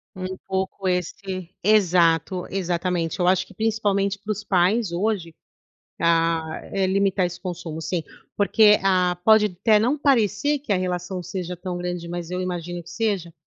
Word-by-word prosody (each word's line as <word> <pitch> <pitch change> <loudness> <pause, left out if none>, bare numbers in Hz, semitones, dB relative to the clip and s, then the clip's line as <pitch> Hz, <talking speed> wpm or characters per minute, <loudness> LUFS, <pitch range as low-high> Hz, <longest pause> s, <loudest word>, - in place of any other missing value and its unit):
Um 185 0 -5
pouco 190 0 -2
esse 180 0 -3
exato, 180 -3 +3
exatamente. 180 -2 -1
Eu 175 - +2
acho 185 0 +2
que - - -15
principalmente 205 -2 0
para 215 - -3
os 210 +1 -4
pais 190 +2 +2
hoje, 175 -2 -1 0.7
ah, 165 -1 +1
é 195 -1 +1
limitar 195 -1 +2
esse 175 0 -7
consumo 170 -3 -6
sim, 175 -1 -2 0.4
porque 210 +1 +5
ah, 180 -2 +2
pode 220 +1 +6
até 215 0 +5
não 250 +8 +1
parecer 275 +1 +2
que 245 -8 -2
a - - +3
relação 180 0 -3
seja 180 0 -5
tão 180 -1 -4
grande, 175 -1 -4
mas 175 -1 -5
eu 180 0 -2
imagino 175 -1 -4
que 165 - -15
seja. 195 -6 -2
185 Hz, 160 wpm, -23 LUFS, 175-205 Hz, 0.7 s, pode